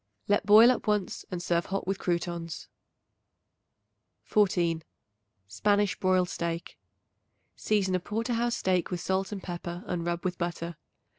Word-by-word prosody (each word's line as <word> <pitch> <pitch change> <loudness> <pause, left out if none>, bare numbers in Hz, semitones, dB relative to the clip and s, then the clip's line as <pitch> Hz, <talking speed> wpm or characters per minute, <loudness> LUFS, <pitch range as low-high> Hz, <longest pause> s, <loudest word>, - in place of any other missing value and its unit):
Let 205 0 +2
boil 220 +4 +9
up 245 - -3
once 210 -3 0
and 175 -1 -4
serve 170 -1 0
hot 195 +1 -2
with 195 +1 -2
croutons. 170 -2 -3 1.6
14. 175 -6 +2 0.6
Spanish 205 - +1
Broiled 185 -1 +3
Steak. 170 -1 -4 0.8
Season 200 -3 +1
a 185 - +2
porter 225 +6 -2
house 235 +2 0
steak 185 -2 +1
with 180 -2 -3
salt 190 +3 -1
and 200 -2 -5
pepper 175 0 -5
and 175 -1 -2
rub 175 +1 -2
with 180 -1 -2
butter. 170 -1 -3
185 Hz, 140 wpm, -28 LUFS, 170-205 Hz, 1.6 s, boil